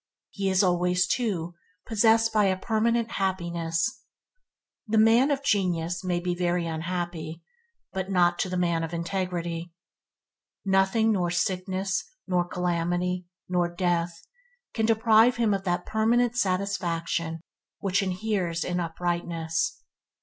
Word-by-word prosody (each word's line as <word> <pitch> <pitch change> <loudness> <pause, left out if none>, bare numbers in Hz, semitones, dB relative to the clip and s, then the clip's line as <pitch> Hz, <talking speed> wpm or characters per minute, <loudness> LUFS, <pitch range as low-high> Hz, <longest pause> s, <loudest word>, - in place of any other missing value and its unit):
He 195 -1 -1
is 190 +1 +3
always, 180 0 +2
too, 185 -8 -1 0.3
possessed 225 0 +3
a 195 -3 +3
permanent 230 +2 +1
happiness. 170 -2 -1 0.9
The 220 +1 +1
man 225 +5 +5
of 280 -1 0
genius 175 -7 0
may 180 -1 0
be 175 0 -1
very 175 -1 0
unhappy, 165 -1 -4 0.5
but 190 0 -3
not 175 -2 +3
to 185 - 0
the 180 - -2
man 170 -2 +1
of 165 +1 -4
integrity. 170 -1 -3 0.9
Nothing 195 +3 +3
nor 180 -4 +1
sickness, 185 +1 -1 0.2
nor 180 -2 +1
calamity, 180 0 -1 0.2
nor 180 -1 +1
death 175 -1 -1 0.2
– - - -41
can 220 -1 0
deprive 225 +1 +5
him 230 -3 +2
of 195 0 -2
that 175 -1 -1
permanent 235 +2 +2
satisfaction 175 -5 -1 0.4
which 195 +1 0
inheres 185 -3 -1
in 180 0 -2
uprightness. 170 - -2
180 Hz, 125 wpm, -26 LUFS, 175-210 Hz, 0.9 s, man